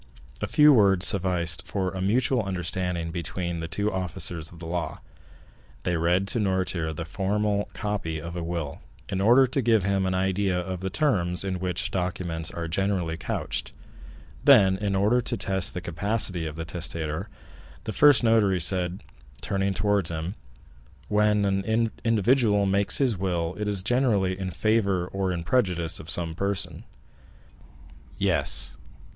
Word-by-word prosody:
A -, -, -1 dB
few 150 Hz, 0 st, +6 dB
words 95 Hz, -6 st, +4 dB
sufficed 90 Hz, -3 st, +1 dB
for 95 Hz, -2 st, -2 dB
a 95 Hz, -, -5 dB
mutual 120 Hz, +5 st, +1 dB
understanding 90 Hz, -3 st, -2 dB
between 85 Hz, 0 st, -3 dB
the 80 Hz, -, -4 dB
two 100 Hz, +6 st, -2 dB
officers 85 Hz, -3 st, -3 dB
of 85 Hz, -, -13 dB
the 85 Hz, -, -8 dB
law. 85 Hz, 0 st, -4 dB, 0.8 s
They 90 Hz, -, 0 dB
read 90 Hz, +4 st, +1 dB
to 120 Hz, -, 0 dB
Noirtier 95 Hz, -5 st, -1 dB
the 80 Hz, +1 st, -5 dB
formal 100 Hz, +3 st, -1 dB
copy 105 Hz, -7 st, -3 dB
of 85 Hz, +2 st, -7 dB
a 85 Hz, -, -3 dB
will, 85 Hz, -4 st, -4 dB, 0.3 s
in 95 Hz, -1 st, -2 dB
order 120 Hz, +6 st, +6 dB
to 135 Hz, +2 st, -1 dB
give 110 Hz, -4 st, +3 dB
him 95 Hz, -1 st, 0 dB
an 95 Hz, -, -1 dB
idea 95 Hz, 0 st, 0 dB
of 90 Hz, 0 st, -4 dB
the 95 Hz, +1 st, -3 dB
terms 95 Hz, -, +1 dB
in 95 Hz, -2 st, -3 dB
which 90 Hz, -1 st, -2 dB
such -, -, -3 dB
documents 90 Hz, -3 st, -2 dB
are 85 Hz, -1 st, -5 dB
generally 90 Hz, -1 st, -1 dB
couched; -, -, -4 dB, 0.7 s
then, 95 Hz, -2 st, +6 dB
in 100 Hz, 0 st, -2 dB
order 105 Hz, +6 st, +2 dB
to -, -, -2 dB
test 95 Hz, -1 st, +2 dB
the 90 Hz, -, -3 dB
capacity 90 Hz, -1 st, 0 dB
of 75 Hz, -, -7 dB
the 80 Hz, 0 st, -5 dB
testator, 80 Hz, +2 st, -3 dB, 0.5 s
the 110 Hz, -, -4 dB
first 145 Hz, 0 st, +6 dB
notary 110 Hz, -5 st, +3 dB
said, 90 Hz, +1 st, +1 dB, 0.4 s
turning 95 Hz, +6 st, -1 dB
towards 100 Hz, -4 st, +1 dB
him: 85 Hz, +2 st, -4 dB, 0.8 s
"When 105 Hz, 0 st, +2 dB
an 110 Hz, +4 st, 0 dB
individual 115 Hz, -2 st, +2 dB
makes 100 Hz, +1 st, +2 dB
his 125 Hz, -9 st, +1 dB
will, 85 Hz, -3 st, -1 dB
it 105 Hz, -, -2 dB
is 100 Hz, -3 st, -1 dB
generally 110 Hz, -6 st, +1 dB
in 95 Hz, -1 st, -3 dB
favor 100 Hz, 0 st, +1 dB
or 95 Hz, -1 st, -2 dB
in 85 Hz, -2 st, -3 dB
prejudice 90 Hz, -6 st, 0 dB
of 80 Hz, -, -8 dB
some 85 Hz, -2 st, 0 dB
person." 100 Hz, +3 st, -2 dB, 1.3 s
"Yes." 65 Hz, 0 st, +1 dB
95 Hz, 160 wpm, -26 LUFS, 85-105 Hz, 1.3 s, few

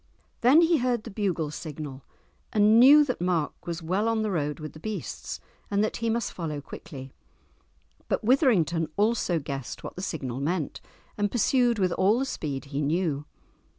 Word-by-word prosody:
Then 265 Hz, +7 st, +6 dB
he 335 Hz, -1 st, +4 dB
heard 245 Hz, -3 st, 0 dB
the 230 Hz, -, -8 dB
bugle 185 Hz, -7 st, -1 dB
signal, 150 Hz, -3 st, -7 dB, 0.5 s
and 215 Hz, +1 st, +5 dB
knew 290 Hz, +4 st, +8 dB
that 250 Hz, -9 st, -3 dB
Mark 175 Hz, -4 st, -1 dB
was 170 Hz, 0 st, -4 dB
well 190 Hz, +7 st, 0 dB
on 225 Hz, -1 st, +1 dB
the 215 Hz, -, -1 dB
road 150 Hz, -4 st, -2 dB
with 155 Hz, -1 st, -7 dB
the 155 Hz, -, -12 dB
beasts, 215 Hz, +5 st, -5 dB, 0.3 s
and 200 Hz, +1 st, +2 dB
that 215 Hz, -, -1 dB
he 230 Hz, 0 st, -1 dB
must 230 Hz, -1 st, -1 dB
follow 155 Hz, -4 st, -4 dB
quickly. 135 Hz, -2 st, -10 dB, 0.9 s
But -, -, -1 dB
Withrington 200 Hz, -, +3 dB
also 210 Hz, -4 st, +2 dB
guessed 140 Hz, -4 st, -5 dB
what -, -, -7 dB
the 185 Hz, -, -6 dB
signal 135 Hz, -9 st, -4 dB
meant, 155 Hz, +2 st, -2 dB, 0.4 s
and 205 Hz, 0 st, +2 dB
pursued 245 Hz, 0 st, +2 dB
with 185 Hz, -3 st, +1 dB
all 195 Hz, +6 st, +3 dB
the 265 Hz, -, 0 dB
speed 145 Hz, -, -4 dB
he 140 Hz, +1 st, -3 dB
knew. 150 Hz, -1 st, 0 dB
185 Hz, 175 wpm, -27 LUFS, 150-225 Hz, 0.9 s, knew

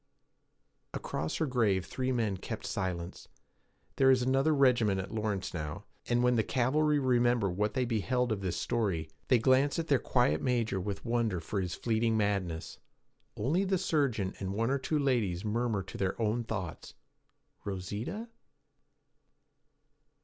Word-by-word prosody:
Across 80 Hz, +1 st, -3 dB
her 160 Hz, -, 0 dB
grave 110 Hz, -9 st, +1 dB
three 130 Hz, 0 st, -2 dB
men 115 Hz, -5 st, 0 dB
kept -, -, -6 dB
silence. 90 Hz, -3 st, -4 dB, 0.7 s
There 135 Hz, -1 st, +5 dB
is 130 Hz, -2 st, +4 dB
another 135 Hz, +4 st, +3 dB
regiment 125 Hz, -9 st, +3 dB
at 95 Hz, -, -5 dB
Lawrence 105 Hz, -3 st, -2 dB
now, 80 Hz, +4 st, -5 dB, 0.2 s
and 120 Hz, 0 st, +2 dB
when 125 Hz, -1 st, +3 dB
the -, -, +4 dB
th -, -, -9 dB
Cavalry 150 Hz, +4 st, +2 dB
remember 120 Hz, -6 st, +2 dB
what 105 Hz, +4 st, -1 dB
they 130 Hz, -1 st, +1 dB
beheld 120 Hz, +2 st, 0 dB
of 105 Hz, -2 st, -1 dB
this 90 Hz, -3 st, -2 dB
story, 90 Hz, -10 st, -1 dB, 0.2 s
they 125 Hz, -, +5 dB
glance 130 Hz, +4 st, +3 dB
at 165 Hz, -1 st, -3 dB
their 140 Hz, -3 st, +4 dB
quiet 100 Hz, -, +2 dB
major 115 Hz, -6 st, 0 dB
with 100 Hz, +4 st, -5 dB
wonder 115 Hz, -6 st, 0 dB
for 95 Hz, +5 st, -3 dB
his 90 Hz, -2 st, -3 dB
fleeting 115 Hz, -1 st, +1 dB
madness. 100 Hz, -6 st, -1 dB, 0.6 s
Only 150 Hz, -, +1 dB
the 190 Hz, -1 st, +1 dB
surgeon 140 Hz, -, 0 dB
and 95 Hz, 0 st, -3 dB
one 115 Hz, +4 st, +1 dB
or 140 Hz, -, +1 dB
two 155 Hz, +3 st, -1 dB
ladies 115 Hz, -10 st, 0 dB
murmur 110 Hz, -2 st, 0 dB
to 95 Hz, -, -9 dB
their 95 Hz, +2 st, -1 dB
own 115 Hz, +1 st, 0 dB
thoughts, 95 Hz, -7 st, -5 dB, 0.7 s
'Rosita?' 105 Hz, -, -4 dB
115 Hz, 155 wpm, -31 LUFS, 95-130 Hz, 0.7 s, There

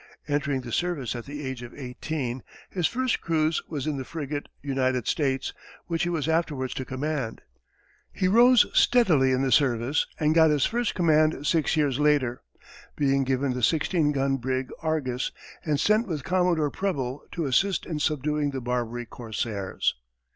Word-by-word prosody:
Entering 145 Hz, -2 st, 0 dB
the 120 Hz, -2 st, -8 dB
service 155 Hz, -6 st, -1 dB
at 120 Hz, -, -6 dB
the 145 Hz, 0 st, -6 dB
age 130 Hz, -2 st, -4 dB
of 120 Hz, 0 st, -9 dB
eighteen, 130 Hz, -1 st, -4 dB, 0.3 s
his 180 Hz, -4 st, +1 dB
first 255 Hz, +1 st, -1 dB
cruise 160 Hz, -1 st, +1 dB
was 145 Hz, -5 st, -3 dB
in 150 Hz, -2 st, -1 dB
the 135 Hz, -, -3 dB
frigate, 145 Hz, 0 st, -5 dB
United 130 Hz, -3 st, 0 dB
States, 135 Hz, -3 st, 0 dB, 0.3 s
which 165 Hz, -1 st, -2 dB
he 175 Hz, -, +1 dB
was 160 Hz, -4 st, -1 dB
afterwards 150 Hz, -6 st, 0 dB
to 130 Hz, -, -4 dB
command. 130 Hz, -2 st, -3 dB, 0.7 s
He 185 Hz, -, 0 dB
rose 240 Hz, +4 st, +6 dB
steadily 165 Hz, -, +4 dB
in 130 Hz, +1 st, +1 dB
the 135 Hz, -, 0 dB
service 125 Hz, +1 st, +2 dB
and 155 Hz, 0 st, +3 dB
got 160 Hz, -1 st, +6 dB
his 150 Hz, -3 st, +3 dB
first 240 Hz, -1 st, -1 dB
command 155 Hz, -4 st, +3 dB
six 160 Hz, 0 st, +1 dB
years 145 Hz, -3 st, +1 dB
later, 145 Hz, -5 st, +2 dB, 0.5 s
being 135 Hz, -1 st, +2 dB
given 130 Hz, 0 st, 0 dB
the 125 Hz, -, -4 dB
sixteen 155 Hz, +3 st, +2 dB
gun 135 Hz, -1 st, +1 dB
brig 130 Hz, +1 st, -2 dB
Argus, 145 Hz, -6 st, -1 dB, 0.3 s
and 150 Hz, -3 st, 0 dB
sent 215 Hz, +6 st, +3 dB
with 155 Hz, -6 st, -3 dB
Commodore 180 Hz, -5 st, +1 dB
Preble 140 Hz, -9 st, -2 dB
to 170 Hz, -3 st, -2 dB
assist 185 Hz, +8 st, +1 dB
in 155 Hz, -3 st, -3 dB
subduing 150 Hz, 0 st, 0 dB
the 135 Hz, -1 st, -4 dB
Barbary 120 Hz, -1 st, -2 dB
corsairs. 110 Hz, -4 st, -2 dB
145 Hz, 165 wpm, -26 LUFS, 130-160 Hz, 0.7 s, rose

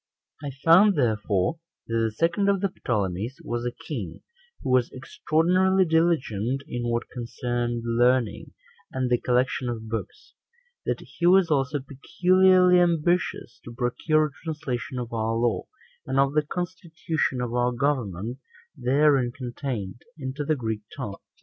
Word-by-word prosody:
3. 145 Hz, -1 st, -5 dB
I 135 Hz, +1 st, -13 dB
found, 185 Hz, +5 st, +7 dB
therefore, 110 Hz, -, 0 dB, 0.3 s
that 115 Hz, -, -6 dB
the 115 Hz, -1 st, +1 dB
second 170 Hz, -, +1 dB
of 200 Hz, -1 st, +2 dB
the 195 Hz, +1 st, 0 dB
Ptolemies 105 Hz, +2 st, -2 dB
was 120 Hz, 0 st, -3 dB
a 120 Hz, -, -7 dB
king 105 Hz, -, -5 dB, 0.4 s
who 135 Hz, -, -1 dB
was 125 Hz, -2 st, +3 dB
extraordinarily 180 Hz, +7 st, +2 dB
diligent 140 Hz, -, +1 dB
in 120 Hz, 0 st, -3 dB
what 120 Hz, 0 st, -1 dB
concerned 120 Hz, 0 st, -3 dB
learning, 120 Hz, 0 st, +1 dB, 0.4 s
and 130 Hz, -1 st, -2 dB
the 120 Hz, -, +2 dB
collection 125 Hz, 0 st, +1 dB
of 110 Hz, -2 st, -5 dB
books; 115 Hz, -, -6 dB, 0.5 s
that -, -, -1 dB
he 175 Hz, -, -2 dB
was 180 Hz, -2 st, +5 dB
also 140 Hz, 0 st, +1 dB
peculiarly 180 Hz, +6 st, +4 dB
ambitious 175 Hz, -5 st, 0 dB
to 120 Hz, -, -10 dB
procure 155 Hz, +6 st, +1 dB
a 150 Hz, -, -5 dB
translation 135 Hz, -6 st, -4 dB
of 120 Hz, -1 st, -5 dB
our 115 Hz, 0 st, -1 dB
law, 115 Hz, 0 st, 0 dB, 0.4 s
and 130 Hz, 0 st, -1 dB
of 135 Hz, 0 st, +3 dB
the 150 Hz, -, +3 dB
constitution 170 Hz, -6 st, -3 dB
of 120 Hz, -1 st, -3 dB
our 125 Hz, 0 st, +2 dB
government 120 Hz, -4 st, -2 dB, 0.4 s
therein 135 Hz, -1 st, +3 dB
contained, 120 Hz, -4 st, -5 dB, 0.2 s
into 135 Hz, 0 st, -4 dB
the 155 Hz, +2 st, +1 dB
Greek 110 Hz, -5 st, -3 dB, 0.2 s
tongue. 105 Hz, -8 st, -5 dB
130 Hz, 145 wpm, -25 LUFS, 120-160 Hz, 0.5 s, found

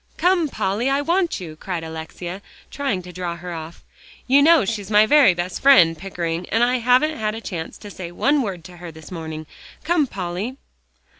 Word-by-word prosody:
"Come, 355 Hz, -4 st, +2 dB
Polly, 215 Hz, +3 st, -1 dB
I 275 Hz, +1 st, +1 dB
want 345 Hz, +3 st, 0 dB
you," 165 Hz, -4 st, -8 dB
cried 175 Hz, +1 st, -5 dB
Alexia, 160 Hz, +3 st, -7 dB, 0.3 s
trying 270 Hz, -10 st, -2 dB
to 180 Hz, 0 st, -11 dB
draw 175 Hz, -1 st, -4 dB
her 175 Hz, +1 st, -7 dB
off. 160 Hz, 0 st, -8 dB, 0.4 s
"You 275 Hz, +2 st, +5 dB
know 320 Hz, -5 st, +6 dB
she's 205 Hz, -2 st, -3 dB
my 210 Hz, 0 st, +6 dB
very 255 Hz, -6 st, +5 dB
best 175 Hz, +1 st, -4 dB
friend, 180 Hz, -13 st, +6 dB
Pickering, 170 Hz, -1 st, -4 dB
and 225 Hz, +2 st, +2 dB
I 250 Hz, +1 st, +2 dB
haven't 250 Hz, +6 st, +3 dB
had 215 Hz, 0 st, -1 dB
a -, -, -5 dB
chance 170 Hz, -7 st, -6 dB
to 205 Hz, -, -11 dB
say 175 Hz, -3 st, -7 dB
one 280 Hz, +11 st, +2 dB
word 190 Hz, -8 st, -4 dB
to 175 Hz, +1 st, -12 dB
her 175 Hz, -1 st, -8 dB
this 160 Hz, +1 st, -13 dB
morning. 160 Hz, -2 st, -6 dB, 0.4 s
Come, 320 Hz, -3 st, +2 dB
Polly." 195 Hz, +6 st, -4 dB
195 Hz, 195 wpm, -22 LUFS, 175-260 Hz, 0.4 s, know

